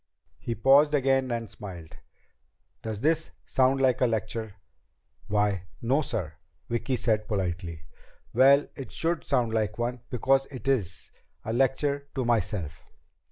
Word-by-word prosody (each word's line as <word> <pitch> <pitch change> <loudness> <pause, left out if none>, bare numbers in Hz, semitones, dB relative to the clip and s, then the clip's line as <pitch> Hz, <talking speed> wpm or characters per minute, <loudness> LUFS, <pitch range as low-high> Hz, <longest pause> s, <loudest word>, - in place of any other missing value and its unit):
He 115 - -3
paused 140 +6 +5
again 135 -1 +2
and 115 -1 -2
smiled. 90 -6 -10 0.8
"Does 110 -2 -5
this 160 +3 +1 0.2
sound 130 +1 +2
like 130 -2 +2
a 125 - +5
lecture?" 110 -1 -3 0.7
"Why 105 -3 +1
no, 130 +6 +2
sir," 90 - -3 0.3
Vicki 120 +3 -1
said 110 -3 0
politely. 90 -6 -3 0.5
"Well, 140 +2 +6
it 135 - -8
should 165 0 -1
sound 115 -3 +1
like 110 -2 0
one 120 +1 -2
because 135 +2 +2
it 135 -1 -9
is. 100 - -1 0.3
A 110 - -2
lecture 140 +3 +1
to 130 -3 -1
myself." 100 -9 -1
120 Hz, 135 wpm, -27 LUFS, 105-135 Hz, 0.8 s, Well